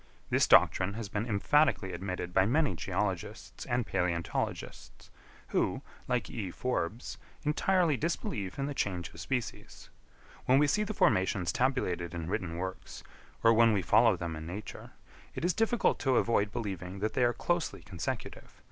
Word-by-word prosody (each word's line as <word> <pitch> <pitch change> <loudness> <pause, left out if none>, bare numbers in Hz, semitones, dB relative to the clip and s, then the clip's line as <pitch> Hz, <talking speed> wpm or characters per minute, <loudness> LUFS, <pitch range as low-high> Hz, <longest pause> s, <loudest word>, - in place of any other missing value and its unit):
This - - +3
doctrine 95 +2 +5
has 110 -3 -5
been 105 +4 -2
emphatically 110 -2 +2
admitted 90 0 -4
by 95 +1 +4
many 145 0 +2
geologists 80 - -4
and 120 -1 0
palæontologists, 85 -1 -3 0.4
who, - - 0 0.2
like 125 -1 0
E. 105 -6 -4
Forbes, 110 0 -3 0.2
entirely 160 0 +2
disbelieve 110 - -3
in 140 - -1
the 145 - -3
change 90 -9 -2
of 80 - -11
species. 120 +8 -5 0.5
When 130 - +5
we 150 - +5
see 150 +9 +2
the 215 0 -4
formations 95 -2 +2
tabulated 90 - 0
in 85 -2 -4
written 85 -2 -2
works, 95 +1 -6 0.4
or 115 - +7
when 115 0 +5
we 100 -3 0
follow 110 +1 +5
them 85 -1 -4
in 80 +1 -7
nature, 100 +4 -7 0.5
it - - -2
is 180 - +2
difficult 225 +3 +1
to 135 -2 +2
avoid 105 -3 +2
believing 95 -5 -5
that 105 +3 -2
they 125 - +2
are 120 - +4
closely 175 +7 -2
consecutive. 90 -4 -6
105 Hz, 155 wpm, -31 LUFS, 90-130 Hz, 0.5 s, or